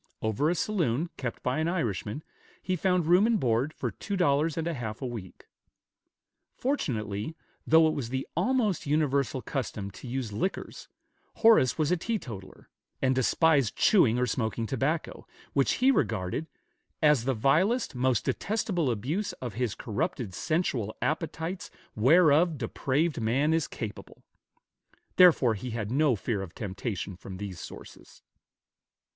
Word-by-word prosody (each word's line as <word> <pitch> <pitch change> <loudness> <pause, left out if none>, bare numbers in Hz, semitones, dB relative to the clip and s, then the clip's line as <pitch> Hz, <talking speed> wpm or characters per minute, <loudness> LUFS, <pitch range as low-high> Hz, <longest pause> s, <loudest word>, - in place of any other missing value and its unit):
Over 110 +8 +1
a 175 - +1
saloon, 170 - 0
kept 120 -3 -5
by 130 +4 0
an 160 - 0
Irishman, 125 - -2 0.4
he 185 - -2
found 180 -1 +1
room 180 +6 +5
and 230 -3 +2
board 125 +2 +1
for - - -4
two 200 -2 -4
dollars 155 -2 +2
and 165 0 -1
a 170 - -1
half 110 -6 -5
a - - -4
week. 115 -7 -7 1.1
Fortunately, 110 - -2 0.3
though 160 0 +6
it 155 - +1
was 125 -6 -4
the 130 +1 -3
almost 235 - +1
universal 140 -3 +1
custom 110 -7 -4
to 125 - -11
use 120 -3 -3
liquors, 150 - -4 0.5
Horace 220 - +5
was 155 0 +1
a 180 - +3
teetotaler, 125 - -6 0.3
and 130 -1 +2
despised 135 0 +2
chewing 130 - +4
or 125 - +2
smoking 115 -1 -2
tobacco, 135 +7 -2 0.3
which 135 -1 +2
he 260 +2 +4
regarded 110 - -1 0.6
"as 150 -6 +4
the 135 -1 +1
vilest, 175 - +2
most 125 -2 +1
detestable 195 - -1
abuse 140 - -2
of 125 -3 -6
his 120 -3 -2
corrupted 105 -1 -3
sensual 120 - -1
appetites 165 +3 -3 0.3
whereof 155 +6 +5
depraved 140 +4 -1
man 135 +8 +2
is 165 -2 +1
capable;" 110 -3 -8 0.9
therefore 160 -10 +6
he 110 +4 -5
had 110 -2 -4
no 140 -1 +3
fear 105 0 -2
of 95 -2 -8
temptation 100 -1 -4
from 95 +1 -9
these 95 -3 -6
sources. - - -12
135 Hz, 145 wpm, -28 LUFS, 115-165 Hz, 1.1 s, though